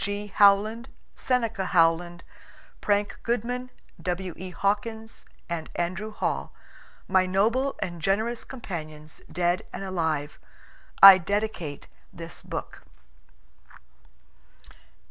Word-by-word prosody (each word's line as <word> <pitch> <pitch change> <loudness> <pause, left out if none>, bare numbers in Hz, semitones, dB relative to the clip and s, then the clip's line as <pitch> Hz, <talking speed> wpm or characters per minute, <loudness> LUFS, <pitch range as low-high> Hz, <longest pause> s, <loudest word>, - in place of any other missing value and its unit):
G. 205 0 -4
Howland, 215 +4 +4 0.3
Seneca 230 -5 0
Howland, 175 0 +2 0.6
Frank 205 0 0
Goodman, 245 +2 -2 0.3
W. 180 0 -3
E. 185 +1 -7
Hawkins, 220 +4 -3 0.2
and 170 -2 -4
Andrew 185 +5 -3
Hall 210 - -2 0.6
my 185 -1 +3
noble 230 +9 +1
and 175 -2 -6
generous 220 +7 0
companions, 155 - -8
dead 175 +2 +1
and - - -6
alive, 160 -6 -2 0.6
I 195 -1 +12
dedicate 190 -5 -3 0.2
this 165 -1 -9
book. - - -7
195 Hz, 95 wpm, -26 LUFS, 175-220 Hz, 0.6 s, I